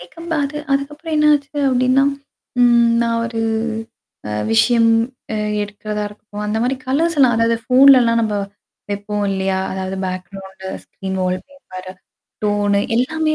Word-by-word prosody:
வெக்கபாக 325 Hz, -, -4 dB
அது 295 Hz, +2 st, -6 dB
அதுக்கப்புறம் 295 Hz, +4 st, -2 dB
என்னாச்சு 300 Hz, -1 st, +2 dB
அப்படின்னா? 255 Hz, +1 st, +3 dB, 0.6 s
ம் 235 Hz, -1 st, +5 dB
நான் 230 Hz, 0 st, 0 dB
ஒரு 230 Hz, -1 st, -4 dB, 1.1 s
விஷயம் 230 Hz, -, +4 dB, 0.4 s
அ -, -, -1 dB, 0.3 s
எடுக்கிறதா 210 Hz, 0 st, -4 dB
இருக்கும். 210 Hz, 0 st, -9 dB
அந்த 210 Hz, +1 st, -1 dB
மாரி 255 Hz, +2 st, 0 dB
கலர்ஸ் 320 Hz, +5 st, +1 dB
எல்லாம். 255 Hz, -4 st, +5 dB
அதாவது 230 Hz, 0 st, +2 dB
ஃபோன்லலாம் 250 Hz, -2 st, +6 dB
நம்ம 215 Hz, -2 st, -1 dB, 0.6 s
வெப்போ 205 Hz, +1 st, -4 dB, 0.2 s
இல்லையா? 190 Hz, 0 st, 0 dB
அதாவது, 190 Hz, 0 st, -4 dB
பேக்ரவுண்ட் 190 Hz, +1 st, -7 dB, 0.2 s
ஸ்க்ரீன்ஹோல்ட் 185 Hz, -1 st, -3 dB
பேப்பரு. 185 Hz, -10 st, -10 dB, 0.5 s
டோனு 205 Hz, -1 st, +2 dB, 0.2 s
எல்லாமே 310 Hz, +5 st, +1 dB
230 Hz, 120 wpm, -19 LUFS, 200-275 Hz, 1.1 s, ஃபோன்லலாம்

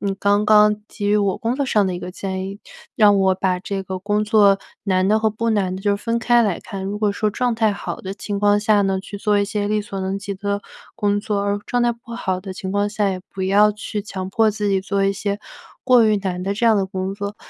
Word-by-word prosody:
你 200 Hz, -1 st, -1 dB
刚 205 Hz, +1 st, +2 dB
刚 210 Hz, 0 st, +5 dB
给 205 Hz, -, -5 dB
予 205 Hz, +1 st, +3 dB
我 200 Hz, -2 st, +1 dB
工 230 Hz, +2 st, -1 dB
作 280 Hz, +1 st, -1 dB
上 210 Hz, -6 st, +2 dB
的 185 Hz, -, -2 dB
一 175 Hz, -, -6 dB
个 180 Hz, -, -6 dB
建 190 Hz, 0 st, -4 dB
议， 195 Hz, +1 st, -7 dB, 0.4 s
让 205 Hz, -2 st, +6 dB
我 190 Hz, -1 st, +3 dB
把 185 Hz, -1 st, 0 dB
这 195 Hz, 0 st, -4 dB
个 190 Hz, -1 st, -5 dB
工 210 Hz, +2 st, 0 dB
作 205 Hz, -2 st, +4 dB, 0.2 s
难 185 Hz, -2 st, +1 dB
的 215 Hz, +2 st, +3 dB
和 220 Hz, -, +2 dB
不 230 Hz, +2 st, -2 dB
难 190 Hz, -4 st, 0 dB
的 -, -, -7 dB
就 200 Hz, 0 st, +1 dB
分 230 Hz, +3 st, -2 dB
开 240 Hz, +1 st, +3 dB
来 205 Hz, -6 st, 0 dB
看。 195 Hz, -3 st, -7 dB
如 205 Hz, +2 st, -3 dB
果 210 Hz, -2 st, +1 dB
说 210 Hz, +1 st, 0 dB
状 245 Hz, +3 st, 0 dB
态 220 Hz, -1 st, +2 dB
好 -, -, -6 dB
的 190 Hz, 0 st, -5 dB
情 200 Hz, 0 st, -4 dB
况 205 Hz, 0 st, +4 dB
下 210 Hz, -1 st, +3 dB
呢， 195 Hz, -1 st, 0 dB
去 205 Hz, +1 st, -8 dB
做 205 Hz, 0 st, +1 dB
一 200 Hz, -, +2 dB
些 205 Hz, 0 st, -2 dB
力 210 Hz, 0 st, +1 dB
所 200 Hz, -2 st, -6 dB
能 190 Hz, +1 st, -2 dB
及 200 Hz, 0 st, -5 dB
的 200 Hz, +1 st, -2 dB, 0.4 s
工 205 Hz, -2 st, +1 dB
作， 205 Hz, -1 st, -1 dB
而 200 Hz, 0 st, 0 dB
状 245 Hz, -, 0 dB
态 240 Hz, 0 st, +2 dB
不 235 Hz, 0 st, -13 dB
好 185 Hz, -6 st, -2 dB
的 190 Hz, 0 st, -7 dB
情 190 Hz, +1 st, -5 dB
况 205 Hz, 0 st, +1 dB
下， 205 Hz, -2 st, 0 dB
也 185 Hz, -1 st, -4 dB
不 190 Hz, -, -5 dB
要 205 Hz, +3 st, +4 dB
去 210 Hz, 0 st, -5 dB
强 190 Hz, -2 st, -6 dB
迫 220 Hz, +2 st, +3 dB
自 210 Hz, 0 st, -2 dB
己 195 Hz, -1 st, +2 dB
做 195 Hz, +1 st, -1 dB
一 195 Hz, -, +2 dB
些 200 Hz, +1 st, -3 dB, 0.5 s
过 250 Hz, -3 st, +6 dB
于 215 Hz, -1 st, +3 dB
难 185 Hz, -2 st, -3 dB
的 195 Hz, +2 st, -1 dB
这 235 Hz, +3 st, +1 dB
样 225 Hz, -1 st, +5 dB
的 195 Hz, -, +1 dB
工 190 Hz, 0 st, -4 dB
作。 200 Hz, +1 st, -5 dB
205 Hz, 285 characters per minute, -21 LUFS, 195-210 Hz, 0.5 s, 让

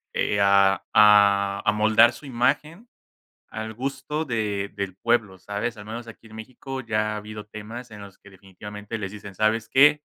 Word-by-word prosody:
Eh, 100 Hz, -, 0 dB
a 100 Hz, -1 st, +4 dB
a 100 Hz, -1 st, +5 dB
amoldar 110 Hz, +3 st, +4 dB
su 120 Hz, +5 st, -13 dB
imagen, 150 Hz, -, -1 dB, 0.6 s
al 110 Hz, 0 st, -6 dB
gusto 135 Hz, +5 st, -4 dB
de 105 Hz, -5 st, -2 dB
del 100 Hz, -2 st, -4 dB
pueblo, 110 Hz, -3 st, 0 dB
¿sabes? 105 Hz, +5 st, -4 dB
Al 105 Hz, -, -9 dB
menos 115 Hz, +2 st, -7 dB
aquí 115 Hz, 0 st, -13 dB
en 110 Hz, -, -14 dB
México, 130 Hz, +4 st, -8 dB
ya 110 Hz, -2 st, -1 dB
ha -, -, -4 dB
habido 105 Hz, 0 st, -8 dB
temas, 110 Hz, +3 st, -9 dB
en 105 Hz, -1 st, -10 dB
los 100 Hz, -2 st, -12 dB
que 100 Hz, -, -17 dB
definitivamente, 105 Hz, +3 st, -9 dB
les 100 Hz, -2 st, -5 dB
dicen: 100 Hz, -2 st, -10 dB
"¿Sabes 110 Hz, +1 st, +1 dB
qué? 150 Hz, +2 st, +5 dB
110 Hz, 170 wpm, -24 LUFS, 100-120 Hz, 0.6 s, a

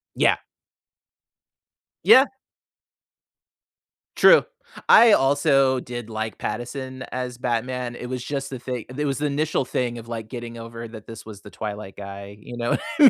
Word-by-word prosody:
Yeah. -, -, +4 dB, 1.7 s
Yeah. 265 Hz, +2 st, +8 dB, 1.9 s
True. -, -, +7 dB, 0.4 s
I 230 Hz, -1 st, +9 dB
also 135 Hz, -3 st, +4 dB
did 120 Hz, -2 st, -7 dB
like 110 Hz, 0 st, -4 dB
Pattinson 130 Hz, +3 st, -5 dB
as 125 Hz, -1 st, -3 dB
Batman. 125 Hz, +1 st, -2 dB
It 125 Hz, -, -6 dB
was 125 Hz, 0 st, -4 dB
just 140 Hz, -1 st, -3 dB
the 130 Hz, -, -5 dB
thing 125 Hz, -2 st, -5 dB
it 150 Hz, -, -1 dB
was 140 Hz, -2 st, -1 dB
the 150 Hz, -, 0 dB
initial 145 Hz, 0 st, 0 dB
thing 120 Hz, -1 st, -2 dB
of, 115 Hz, 0 st, -11 dB
like, 115 Hz, -2 st, -5 dB
getting 120 Hz, -1 st, -7 dB
over 115 Hz, 0 st, -8 dB
that 110 Hz, -2 st, -11 dB
this 115 Hz, -1 st, -10 dB
was 105 Hz, -2 st, -10 dB
the 105 Hz, -, -12 dB
Twilight 105 Hz, -2 st, -6 dB
guy. 100 Hz, 0 st, -8 dB
You 120 Hz, +3 st, -9 dB
know 120 Hz, 0 st, -1 dB
what -, -, +1 dB
I -, -, -10 dB
mean? -, -, -7 dB
120 Hz, 160 wpm, -24 LUFS, 115-135 Hz, 1.9 s, I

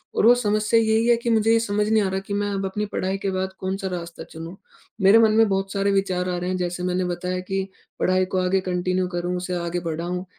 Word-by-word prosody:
और -, -, +2 dB
वो 240 Hz, -, +8 dB
समस्या 215 Hz, -1 st, +2 dB
यही 220 Hz, +1 st, +2 dB
है 240 Hz, -, +6 dB
कि 235 Hz, 0 st, -3 dB
मुझे 225 Hz, -1 st, +3 dB
ये 230 Hz, -, +5 dB
समझ 210 Hz, -2 st, 0 dB
नहीं 220 Hz, 0 st, +3 dB
आ 195 Hz, -, 0 dB
रहा 190 Hz, 0 st, -1 dB
कि 195 Hz, +1 st, -7 dB
मैं 205 Hz, 0 st, -1 dB
अब 195 Hz, 0 st, -2 dB
अपनी 210 Hz, +2 st, -2 dB
पढ़ाई 190 Hz, -1 st, -2 dB
के 195 Hz, 0 st, -2 dB
बाद 190 Hz, 0 st, -2 dB
कौन-सा 190 Hz, +1 st, -3 dB
रास्ता 170 Hz, -2 st, -6 dB
चुनूँ? 165 Hz, +2 st, -9 dB, 0.5 s
मेरे 195 Hz, +4 st, +7 dB
मन 220 Hz, -1 st, +5 dB
में 225 Hz, 0 st, +5 dB
बहुत 195 Hz, 0 st, -1 dB
सारे 200 Hz, 0 st, +1 dB
विचार 185 Hz, -2 st, 0 dB
आ 180 Hz, -, -1 dB
रहे 180 Hz, +1 st, -3 dB
हैं 185 Hz, -, -1 dB
जैसे 180 Hz, 0 st, -3 dB
मैंने 180 Hz, 0 st, 0 dB
बताया 180 Hz, +1 st, -3 dB
कि 195 Hz, +1 st, -3 dB, 0.3 s
पढ़ाई 185 Hz, 0 st, +2 dB
को -, -, +1 dB
आगे 185 Hz, +1 st, +2 dB
कंटिन्यू 185 Hz, 0 st, -1 dB
करूँ 175 Hz, 0 st, -3 dB
उसे 180 Hz, 0 st, -3 dB
आगे 170 Hz, 0 st, -2 dB
बढ़ाऊँ 175 Hz, +2 st, -4 dB
190 Hz, 250 wpm, -23 LUFS, 180-205 Hz, 0.5 s, वो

